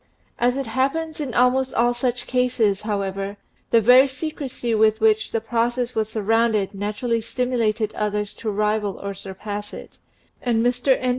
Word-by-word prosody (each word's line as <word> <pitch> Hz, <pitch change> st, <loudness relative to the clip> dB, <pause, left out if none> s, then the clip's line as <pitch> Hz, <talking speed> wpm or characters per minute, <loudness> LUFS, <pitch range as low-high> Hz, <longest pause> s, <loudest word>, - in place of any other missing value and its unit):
As 245 Hz, +1 st, +2 dB
happens 275 Hz, +7 st, -1 dB
in 265 Hz, -5 st, -4 dB
almost 255 Hz, +1 st, +2 dB
all 240 Hz, +1 st, +3 dB
such 245 Hz, 0 st, -2 dB
cases, 245 Hz, -6 st, +1 dB
however, 200 Hz, -1 st, -3 dB, 0.3 s
the 230 Hz, -, +5 dB
very 250 Hz, +5 st, +7 dB
secrecy 265 Hz, -3 st, -4 dB
with 220 Hz, 0 st, +3 dB
which 220 Hz, -1 st, +2 dB
the 225 Hz, -, 0 dB
process 240 Hz, +2 st, -1 dB
was 220 Hz, -1 st, -1 dB
surrounded 220 Hz, -1 st, +1 dB
natu 205 Hz, +3 st, -5 dB
rally 230 Hz, -2 st, +1 dB
stimulated 230 Hz, -2 st, -1 dB
others 210 Hz, -1 st, -2 dB
to 225 Hz, -, -3 dB
rival 210 Hz, -1 st, 0 dB
or 200 Hz, 0 st, -4 dB
surpass 205 Hz, +2 st, -6 dB
it, -, -, -12 dB, 0.4 s
and 235 Hz, -2 st, +1 dB
Mr. 250 Hz, +2 st, +2 dB
N. 255 Hz, -, -1 dB
230 Hz, 155 wpm, -22 LUFS, 210-250 Hz, 0.4 s, very